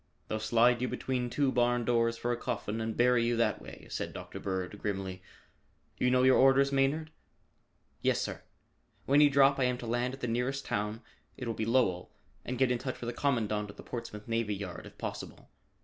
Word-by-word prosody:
"They'll 110 - -1
slide 120 +2 +3
you 125 - +1
between 125 -2 -2
two 140 +2 +1
barn 120 -1 +2
doors 115 -1 +2
for 120 - -1
a - - +1
coffin 115 -2 -3
and 110 0 -3
bury 125 -1 +4
you 120 0 +1
that 115 - +1
way," - - -11
said - - -3
Dr. - - -8
Bird 95 +1 -3
grimly. 95 -2 -3 0.8
"You 125 - +3
know 125 0 +3
your 130 0 +6
orders, 135 +1 +5
Maynard?" 140 +4 +1 0.9
"Yes, - - +2
sir. - - -4 0.6
When 140 +2 +5
you 145 - +7
drop, 140 0 +4
I 130 - +3
am 125 0 +1
to 120 - -7
land 120 +2 -1
at 135 - -18
the 125 - -1
nearest 125 +4 -1
town 105 +3 -2 0.3
it 125 - -5
will 115 - -1
be 110 0 -3
Lowell 115 -8 +2 0.3
and 125 - -4
get 130 0 +3
in 125 - 0
touch 130 +1 -5
with 120 0 -4
the - - -11
Commandant 110 -7 0
of 100 - -10
the - - -10
Portsmouth 115 -3 -7
Navy 115 -2 0
Yard 95 -3 -7
if - - -16
possible. - - -7
120 Hz, 210 wpm, -31 LUFS, 110-130 Hz, 0.9 s, you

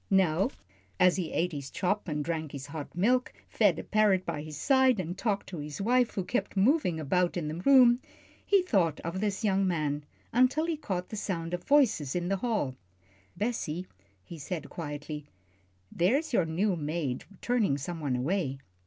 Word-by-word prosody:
Now 190 +2 +3 0.5
as 180 0 +5
he 175 -4 -2
ate 180 +2 0
his 140 -3 -6
chop 200 +2 -1
and 150 -2 -2
drank 160 -3 -3
his 140 -1 -6
hot 145 +1 -7
milk, 250 +7 +2 0.2
fed 200 -7 +3
a - - -5
parrot 205 -3 +2
by 150 - -3
his 155 -1 -8
side, 260 - +4
and 175 0 -3
talked 205 -1 -1
to 175 - -6
his 150 0 -6
wife, 245 +3 +2
who 190 - -1
kept 210 +2 -2
moving 200 - +3
about 175 +4 +1
the 160 -1 -3
room, 250 -3 +7 0.4
he 395 -2 +3
thought 180 - +1
of 170 +3 -4
this 205 0 -1
young 195 -2 +2
man, 150 -4 -1 0.3
until 255 +6 +3
he 335 -1 -1
caught 190 - -4
the - - -6
sound 175 -5 -3
of 180 - -4
voices 240 - +3
in 175 0 -1
the 195 - +1
hall. 210 - -1 0.6
"Bessie," 185 -7 -2 0.4
he 165 - -10
said, 150 0 -5
quietly, 150 -2 -6 0.6
"there's 250 - +1
your 185 -7 +3
new 180 +5 0
maid 150 -4 -3
turning 225 - +1
some 165 +4 -5
one 140 -5 -1
away." 140 +1 -1
180 Hz, 180 wpm, -29 LUFS, 155-215 Hz, 0.6 s, room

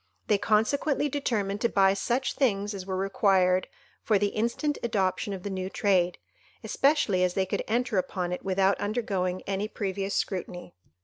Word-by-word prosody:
They 205 -2 +3
consequently 275 +8 +1
determined 215 -8 -1
to 235 - +2
buy 195 -1 +4
such 240 +7 -1
things 205 -6 0
as 190 -1 -7
were 190 -1 -2
required 190 -1 +2 0.3
for 215 - +2
the 205 +1 +1
instant 235 +8 -1
adoption 205 -2 0
of 190 -2 -6
the 205 - -4
new 185 0 -3
trade, 185 -3 +1 0.5
especially 270 -10 +2
as 180 -1 0
they 190 - +1
could 185 - -2
enter 235 -2 +1
upon 180 -1 -3
it 180 - -5
without 195 0 +2
undergoing 195 -4 -1
any 200 +1 -2
previous 195 -2 -3
scrutiny. 180 -2 -3
200 Hz, 165 wpm, -27 LUFS, 190-220 Hz, 0.5 s, buy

